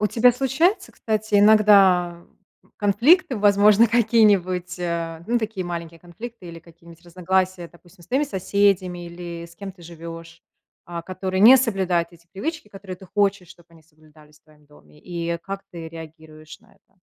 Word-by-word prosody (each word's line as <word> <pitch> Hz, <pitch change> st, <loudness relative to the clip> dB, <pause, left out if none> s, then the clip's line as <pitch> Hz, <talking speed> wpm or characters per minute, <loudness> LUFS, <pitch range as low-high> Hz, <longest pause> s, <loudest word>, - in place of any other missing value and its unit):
У 210 Hz, -, +1 dB
тебя 245 Hz, +1 st, +4 dB
случаются, 270 Hz, -, 0 dB
кстати, 215 Hz, -1 st, -2 dB
иногда 195 Hz, -5 st, +4 dB, 0.5 s
конфликты, 240 Hz, -, +3 dB
возможно, 205 Hz, +2 st, +5 dB
какие-нибудь, 205 Hz, -6 st, +2 dB
а, 170 Hz, -1 st, -4 dB
ну, 240 Hz, +3 st, 0 dB
такие 220 Hz, -5 st, -4 dB
маленькие 170 Hz, -1 st, -7 dB
конфликты 205 Hz, +4 st, -11 dB
или 165 Hz, 0 st, -10 dB
какие-нибудь 170 Hz, +1 st, -18 dB
разногласия. 185 Hz, 0 st, -2 dB
Допустим, 175 Hz, +1 st, -21 dB
с -, -, -20 dB
твоими 270 Hz, +4 st, +1 dB
соседями 190 Hz, -5 st, 0 dB
или 170 Hz, -1 st, -8 dB
с 170 Hz, -, -18 dB
кем 195 Hz, +2 st, -8 dB
ты 180 Hz, -2 st, -18 dB
живешь, 165 Hz, 0 st, -11 dB, 0.4 s
а, 170 Hz, -1 st, -7 dB
которые 185 Hz, +1 st, -4 dB
не 245 Hz, +5 st, +9 dB
соблюдают 190 Hz, -8 st, 0 dB
эти 170 Hz, 0 st, -21 dB
привычки, 315 Hz, -, -5 dB
которые 195 Hz, -2 st, -10 dB
ты 190 Hz, -, -15 dB
хочешь, 195 Hz, -1 st, 0 dB
чтобы 170 Hz, -2 st, -18 dB
они 165 Hz, -1 st, -20 dB
соблюдались 155 Hz, -1 st, -22 dB
в -, -, -65 dB
твоем 150 Hz, -1 st, -25 dB
доме, 75 Hz, -, -21 dB
и 170 Hz, -1 st, -4 dB
как 195 Hz, +3 st, -7 dB
ты 165 Hz, -2 st, -8 dB
реагируешь 160 Hz, -1 st, -13 dB
на -, -, -26 dB
это? 190 Hz, -1 st, -34 dB
180 Hz, 160 wpm, -22 LUFS, 170-205 Hz, 0.5 s, не